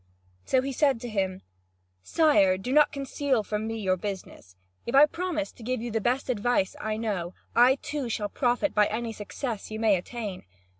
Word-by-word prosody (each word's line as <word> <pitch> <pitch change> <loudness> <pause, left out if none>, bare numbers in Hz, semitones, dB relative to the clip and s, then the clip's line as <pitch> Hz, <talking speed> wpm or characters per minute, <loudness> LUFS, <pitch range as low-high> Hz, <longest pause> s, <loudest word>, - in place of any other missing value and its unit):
So 260 - +2
he 275 - -2
said 270 -2 +2
to 245 - -5
him: 190 -3 -2 0.6
"Sire, 200 - +3
do 220 +7 -5
not 300 0 +5
conceal 275 -3 -1
from 210 +1 -3
me 225 0 -3
your 190 -3 0
business, 185 - -7 0.3
if 235 - -1
I 285 +2 +9
promise 325 -1 -3
to - - -17
give 250 +2 -2
you 235 +1 -4
the 225 0 -1
best 250 +5 0
advice 240 -5 0
I 215 0 -2
know. 195 -6 -3 0.2
I 250 +2 +6
too 285 -4 -3
shall 210 -2 -1
profit 245 +5 0
by 210 -1 +4
any 225 +1 -3
success 215 +1 -5
you 215 0 -5
may 220 -3 +4
attain. 200 - -5
230 Hz, 190 wpm, -27 LUFS, 205-265 Hz, 0.6 s, I